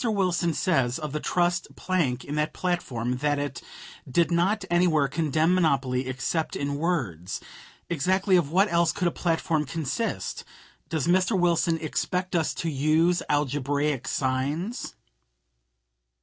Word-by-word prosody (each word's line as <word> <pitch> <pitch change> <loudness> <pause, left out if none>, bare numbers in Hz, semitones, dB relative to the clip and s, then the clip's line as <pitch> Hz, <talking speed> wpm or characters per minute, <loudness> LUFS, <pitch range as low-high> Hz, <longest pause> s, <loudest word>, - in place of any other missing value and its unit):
Wilson 185 -7 +1
says 135 -9 +1
of 155 -3 -5
the 150 - -1
trust 175 +2 0
plank 150 -10 -1
in 145 - -5
that 150 0 0
platform 125 -9 -2
that 145 +2 +1
it 145 0 -4 0.5
"did 170 +7 +2
not 190 +4 +1
anywhere 175 -5 +3
condemn 160 +3 +1
monopoly 135 -7 +1
except 130 +5 -2
in 140 0 -2
words." 115 - -2 0.5
Exactly 185 +5 +2
of 170 -6 +2
what 195 +4 +4
else 170 -1 +3
could 180 - -1
a - - +1
platform 165 -3 0
consist? 160 - -3 0.5
Does 160 -4 -1
Mr. 185 +3 +2
Wilson 170 -1 +2
expect 180 +4 -2
us 165 -2 +1
to 170 - -3
use 160 +4 +2
algebraic 145 -1 0
signs? 140 - -2
160 Hz, 135 wpm, -26 LUFS, 140-175 Hz, 0.5 s, what